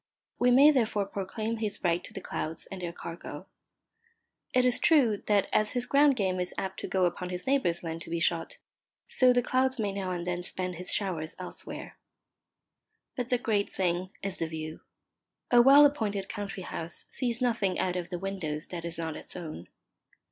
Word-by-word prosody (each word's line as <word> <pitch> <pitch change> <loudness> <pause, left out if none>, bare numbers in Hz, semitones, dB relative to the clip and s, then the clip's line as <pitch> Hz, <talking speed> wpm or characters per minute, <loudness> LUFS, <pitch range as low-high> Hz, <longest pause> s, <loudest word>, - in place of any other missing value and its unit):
We 245 - +4
may 275 +5 +8
therefore 220 -7 +1
proclaim 215 +3 -3
his 215 -2 -3
right 175 -1 +1
to - - -10
the - - -6
clouds 160 +1 -4
and 190 -1 -6
their 175 -1 -3
cargo. 170 0 -8 1.1
It 255 0 +3
is 250 -1 +2
true 260 -10 +4
that 205 -2 +3
as 215 0 +2
his 245 -1 +1
ground 280 +1 +5
game 190 -5 0
is 180 - -1
apt 190 0 -3
to - - -4
go 185 -1 +2
upon 180 +1 -2
his 180 0 -4
neighbour's 260 -12 +1
land 165 0 -4
to - - -9
be 170 0 -1
shot, 165 0 0 0.5
so 255 -1 +4
the 245 0 +3
clouds 260 +2 +1
may 210 -3 -1
now 195 -1 -3
and 175 -1 -3
then 180 0 -2
spend 180 0 -2
his 180 +1 -3
showers 170 -6 -2
elsewhere. - - -8 1.2
But 250 -2 -3
the 250 - +3
great 215 -4 0
thing 180 0 0
is 195 -1 -2
the 165 - 0
view. 155 0 -6 0.7
A 240 -1 +8
well 280 +4 +8
appointed 210 -9 0
country 195 -2 -5
house 165 -1 -4
sees 240 -3 -1
nothing 220 -7 +1
out 180 -1 0
of 175 -1 -3
the 175 - -3
windows 170 -5 -4
that 170 -2 -5
is 170 -1 -2
not 160 -1 -3
its - - -5
own. 155 - -7
195 Hz, 190 wpm, -29 LUFS, 175-240 Hz, 1.2 s, may